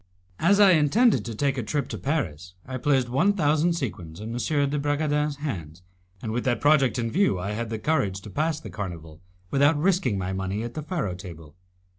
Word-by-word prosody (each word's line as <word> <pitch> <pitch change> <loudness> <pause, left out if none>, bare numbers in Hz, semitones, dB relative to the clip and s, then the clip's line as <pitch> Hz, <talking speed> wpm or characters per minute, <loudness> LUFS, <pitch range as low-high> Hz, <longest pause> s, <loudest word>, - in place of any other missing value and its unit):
As 200 +1 +4
I 200 -2 +8
intended 185 - +4
to 115 -1 -5
take 140 +2 0
a - - 0
trip 140 +4 -2
to - - -4
Paris, 90 - -3
I 130 0 -5
placed 135 -2 +2
one 155 +12 +2
thousand 155 -1 +2
sequins 90 - -5
in 110 +2 -6
M. 140 +3 0
de 150 - 0
Bragadin's 145 0 0
hands, 90 - -6 0.4
and 110 - -3
with 120 +2 -1
that 125 -2 +1
project 140 -5 +3
in 115 -1 -1
view 190 - +2
I 95 +3 -3
had 115 +2 -3
the 110 - -3
courage 105 -7 0
to 105 - -10
pass 155 +3 0
the - - -9
carnival 85 -6 -7 0.3
without 145 +3 +4
risking 160 - +1
my 95 0 -3
money 95 +3 -3
at 120 0 -5
the 155 - -4
faro 150 - -2
table. 85 -4 -10
130 Hz, 205 wpm, -25 LUFS, 100-150 Hz, 0.4 s, I